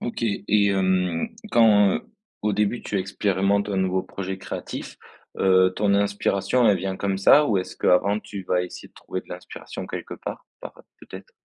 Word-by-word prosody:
OK. 120 - -5
Et 105 -1 +1
hem, 95 -3 0 0.2
quand, 105 -4 +5 0.4
au 105 - +1
début 105 +3 0
tu 100 - -2
expérimentes 100 +1 0
un 100 - -2
nouveau 95 0 0
projet 95 0 -6
créatif, - - -7 0.4
heu, 95 -1 +4
ton 100 -1 +2
inspiration, 100 +4 +1
elle 100 - +4
vient 95 +1 -3
comme 95 -1 -2
ça? 145 +9 +6
Ou 105 -4 +2
est-ce 90 - -6
qu'avant 100 +3 +3
tu 100 -2 -8
vas 90 0 0
essayer 90 - -9
de - - -38
trouver 95 - -6
de - - -25
l'inspiration 90 0 -8
quelque - - -6
part, - - -7 0.2
par - - -8 0.3
peut-être? - - -12
100 Hz, 175 wpm, -24 LUFS, 95-105 Hz, 0.4 s, ça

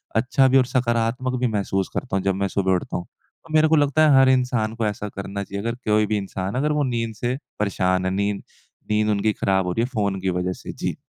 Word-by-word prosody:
अच्छा 130 +4 +3
भी 130 +1 +4
और 130 - +4
सकारात्मक 125 0 0
भी 125 - +2
महसूस 100 -3 -1
करता 125 - -3
हूँ 95 - -2
जब 95 -1 +1
मैं 100 0 0
सुबह 95 0 0
उठता 90 - -3
हूँ। 90 - -6
तो 160 - -18
मेरे 155 0 +5
को 160 - +4
लगता 150 +1 +4
है 135 -2 +6
हर 135 0 +6
इंसान 125 -4 +1
को 115 -1 -1
ऐसा 105 0 -4
करना 100 0 -4
चाहिए। 100 0 -5
अगर 115 +1 -2
कोई 105 0 +3
भी 105 0 0
इंसान 95 0 -4
अगर 145 +4 +1
वो 150 -1 +1
नींद 115 -4 -2
से 120 +4 -2 0.2
परेशान 95 -2 0
है, 95 - 0
नींद 100 +1 -1 0.5
नींद 105 0 +2
उनकी 105 +1 +1
खराब 95 -2 +1
हो - - 0
रही 115 +6 0
है - - -1
फ़ोन 100 -4 0
की 95 - 0
वजह 90 0 -1
से। - - -5
जी। - - -3
110 Hz, 250 wpm, -23 LUFS, 100-125 Hz, 0.5 s, है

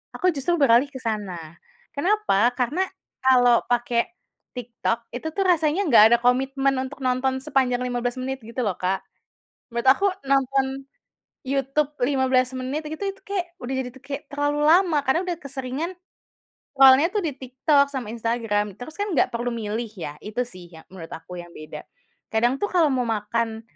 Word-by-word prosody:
aku 365 - 0
justru 310 +6 0
beralih 255 0 +5
ke 260 - -8
sana, 185 -7 -4 0.4
kenapa? 350 - +2
Karena 285 +9 0 0.4
kalau 245 -2 +5
pake 240 -1 +1 0.5
TikTok, 235 -1 -3
itu 315 - -4
tuh 390 - +1
rasanya 330 +1 +2
nggak 230 -6 +8
ada - - +2
komitmen 270 +2 +2
untuk 275 +1 -8
nonton 255 +1 0
sepanjang 260 -4 +1
15 245 0 -2
menit 265 +1 -3
gitu 230 +3 -5
loh, 200 -4 -1
Kak. 185 +1 -1 0.7
Menurut 235 +2 -2
aku 395 +9 +3 0.2
nonton 270 0 +1 0.6
YouTube 275 +2 0
15 260 -1 +2
menit 260 +4 -3
gitu, 315 +5 -6
itu - - -24
kayak 375 -4 -4
udah 260 +2 -3
jadi 250 - -3
tuh 265 - -15
kayak 280 +1 -6
terlalu 290 0 0
lama 340 -2 +5
karena 265 +7 +2
udah 350 -3 -2
keseringan 275 +4 -4 0.9
lawannya 270 +4 +8
tuh 420 - +1
di 300 - -1
TikTok 280 +2 +2
sama 250 -6 -4
Instagram, 225 -3 -1
terus 310 +6 -9
kan 410 - 0
nggak - - +3
perlu 240 +1 -1
milih 225 +1 -3
ya, 155 -4 -6
itu 215 +4 -2
sih 180 -6 -11
ya 160 -1 -13
menurut 170 -4 -9
aku 180 +2 -10
yang 175 - -11
beda. 155 0 -9 0.5
Kadang 240 +4 +2
tuh 410 - +1
kalau 340 -4 +4
mau 250 -2 0
makan, 225 +1 -2
260 Hz, 165 wpm, -24 LUFS, 230-285 Hz, 0.9 s, nggak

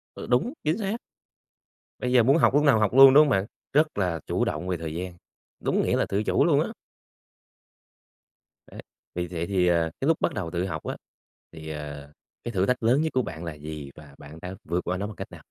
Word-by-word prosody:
Ừ, - - -8
đúng. 220 - +1
Chính 155 +4 +1
xác. 210 0 -2 1.0
Bây 125 0 -2
giờ 125 - +6
muốn 135 +6 +4
học 160 - +3
lúc 145 - +4
nào 135 -6 +5
học 105 +1 +1
luôn, 135 0 +9
đúng 150 - +9
không - - -1
bạn? 95 -3 +1 0.3
Rất 150 -5 +2
là 90 -4 0
chủ - - 0
động 90 - -3
về 90 - 0
thời 80 -1 -6
gian, 90 +1 -5 0.5
đúng - - +1
nghĩa - - +1
là - - +1
tự 100 +2 0
chủ - - +2
luôn - - +4
á. - - -2 2.0
Đấy, - - -9 0.3
vì 90 0 -2
vậy 85 -1 -4
thì, 95 -3 +1
à, 85 -2 +2
cái 135 - 0
lúc 165 - +3
bắt - - +1
đầu 85 -6 -4
tự 90 +1 -1
học 95 - -5
á - - -4 0.6
thì, 80 -1 -9
ờ, 75 -1 -7 0.3
cái 120 - -4
thử 95 -2 +1
thách 125 -2 0
lớn 125 +6 +4
nhất 160 - -1
của 130 - +2
bạn 80 -6 -7
là 85 - -5
gì 75 -1 -8
và 75 -3 -14
bạn 75 +3 -12
đã 90 +1 -6
vượt 85 +2 -1
qua 90 - -1
nó 100 +2 -3
bằng 105 - -9
cách - - -8
nào? - - -12
95 Hz, 235 wpm, -26 LUFS, 80-125 Hz, 2.0 s, luôn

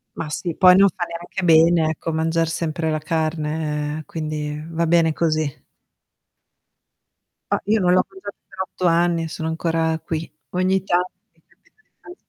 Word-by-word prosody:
Ma 155 - -5
sì, 165 +2 -3
poi 185 -1 +7
non 195 +1 +6
fa 180 -3 -4
neanche 175 +2 -6
bene, 165 -1 +5
ecco, 160 +1 -3
mangiar 165 +1 +1
sempre 160 0 -2
la 155 - -1
carne, 155 -1 -2
quindi 150 -1 -4
va 165 0 0
bene 165 -1 +3
così. 155 -3 -1 1.9
Ah, - - +2
io 215 +2 +2
non 180 -2 +3
l'ho 185 - +4
mangiata 380 - -9
per - - -7
8 185 -1 -5
anni, 170 0 +2
e - - -3
sono 160 0 -5
ancora 160 0 0
qui. 160 0 -4 0.2
Ogni 185 +1 +1
tanto 180 -1 0 0.2
mi 165 - -33
capita - - -32 0.4
di - - -20
165 Hz, 160 wpm, -21 LUFS, 155-175 Hz, 1.9 s, poi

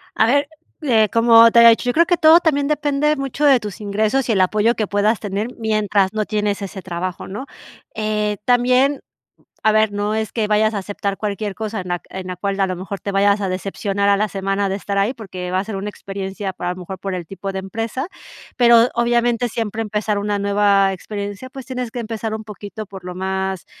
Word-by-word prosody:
A - - +4
ver, 285 +5 +2 0.3
eh, 225 -8 +3
como 230 +1 +7
te 235 - +6
había 235 0 +9
dicho, 230 +2 +3
yo - - +1
creo 335 +5 +4
que 350 0 +2
todo 320 +1 +7
también 285 -5 +1
depende 295 0 +1
mucho 275 +1 -2
de 275 -3 +6
tus 210 0 -7
ingresos 215 +6 0
y - - +4
el 190 - +3
apoyo 210 +5 +2
que 215 - -1
puedas 205 +2 +1
tener 205 +1 -3
mientras 210 -3 +1
no 215 -1 -1
tienes 210 -1 -1
ese 195 0 -6
trabajo, 180 0 -5
¿no? 210 +8 -6 0.5
Eh, 210 -1 -1
también, 250 +3 +3 0.6
a 215 - +4
ver, 215 -1 +3
no 205 +1 -1
es 220 -1 -2
que 220 -3 0
vayas 215 +1 +2
a - - -1
aceptar 200 0 -3
cualquier 205 -1 -3
cosa 215 0 -4
en 180 - -8
la 175 -1 -2
en 190 -1 -6
la 180 - -5
cual 195 +2 -2
a 195 - +3
lo 185 -1 -3
mejor 190 +2 -6
te 200 - -4
vayas 200 +1 +3
a 195 - -1
decepcionar 195 +2 -2
a 200 - +5
la 210 +1 0
semana 195 +1 -1
de 195 - -1
estar 200 0 -3
ahí, 205 +6 +1
porque 185 -6 -7
va 185 - 0
a - - -4
ser 210 -1 -5
una 200 +2 -4
experiencia 195 0 -5
para 175 -1 -4
a - - 0
lo 185 - -10
mejor 185 +1 -7
por 195 +1 -4
el 175 -2 -5
tipo 195 +2 -6
de 190 - -4
empresa. 225 - -4 0.5
Pero 235 -1 +6
obviamente 240 0 +1
siempre 225 -1 -3
empezar 210 -1 -1
una 205 0 -1
nueva 200 -1 +3
experiencia, 205 +5 -6
pues 265 -2 -9
tienes 250 -2 -4
que 245 - -6
empezar 225 -1 -4
un 220 0 -6
poquito 210 0 -8
por 190 -1 -11
lo 180 0 -6
más, 190 0 -3
210 Hz, 225 wpm, -20 LUFS, 195-230 Hz, 0.6 s, había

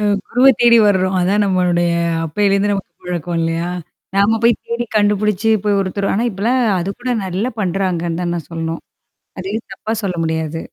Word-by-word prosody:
அ - - -2 0.3
குருவ 250 +2 +3
தேடி 235 -1 +6
வர்றோம். 190 -2 +2
அதான் 195 +4 +2
நம்மளுடைய 175 -2 +1 0.3
அப்பேலருந்து 200 +4 +1
நமக்கு 195 -1 -4
பழக்கம் 175 -1 -3
இல்லயா! 165 +1 -1 0.5
நாம 205 +3 +3
போய் 235 0 +6
தேடி 235 +1 -2
கண்டுபிடிச்சு 210 0 +1 0.2
போய் 205 -1 +2
ஒருத்தரும் 195 +1 -1
ஆனா 230 +4 0
இப்பலாம் 225 +7 0 0.2
அது 175 +3 -3
கூட 250 +1 -3
நல்லா 190 +5 -2
பண்றாங்கன்னு 175 -3 -1
தான் 175 -1 -1
நான் 170 -3 -5
சொல்லணும். 165 0 -4 0.6
அதையும் 200 +5 -4
தப்பா 220 -3 -4
சொல்ல 185 -2 -2
முடியாது. 160 0 -2
195 Hz, 160 wpm, -18 LUFS, 175-210 Hz, 0.6 s, தேடி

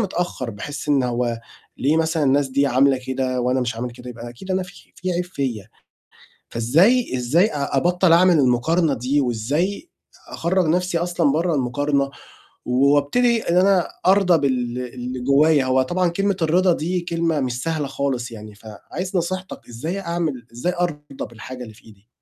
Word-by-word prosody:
متأخر، 175 - -2
باحس 145 +8 -7
إن 140 -3 +3
هو 120 -1 -1 0.4
ليه 145 +4 +1
مثلًا 160 0 +1
الناس 140 +1 +2
دي 140 +2 +1
عاملة 135 +1 +3
كده 130 -1 -1
وأنا 125 +1 +1
مش 120 -2 -2
عامل 125 +2 -4
كده؟ 125 +1 -10
يبقى 120 0 -8
أكيد 155 +11 -10
أنا 185 0 +1
في 180 0 -14
في 185 -2 -2
عيب 175 +1 -1
فيّا، 130 - -4 0.8
فإزاي 165 - +2
إزاي 140 - +3
أ 140 -6 -3
أبطّل 175 +4 +3
أعمل 175 -1 +5
المقارنة 140 +5 +2
دي 130 +4 0
وإزاي 145 - -1 0.4
أخرّج 180 +1 0
نَفْسي 180 +1 +1
أصلًا 170 -4 +1
برّه 165 +3 +1
المقارنة، 140 +1 0 0.5
وأبتدي 145 - +2
إن 170 - 0
أنا 185 -1 +4 0.2
أرضى 185 -3 +5
بال 125 -3 -1 0.2
اللي 125 +1 -5
جوايّا؟ 140 +2 +4
هو 130 0 +3
طبعًا 175 +6 0
كلمة 195 +2 0
الرِضا 175 +3 +3
دي 175 +4 -2
كلمة 165 -2 -1
مش 125 -1 -2
سهلة 160 -3 -1
خالص 135 -3 -2
يعني، 105 -2 -10
فعايز 115 - -7
نصيحتك، 185 +2 -4
إزاي 155 +12 -4
أعمل 170 -9 -3
إزاي 150 +10 -2
أرضى 150 -5 -3
بالحاجة 125 +2 -9
اللي 110 -3 -10
في - - -21
إيدي؟ 105 +1 -19
145 Hz, 165 wpm, -21 LUFS, 125-175 Hz, 0.8 s, أعمل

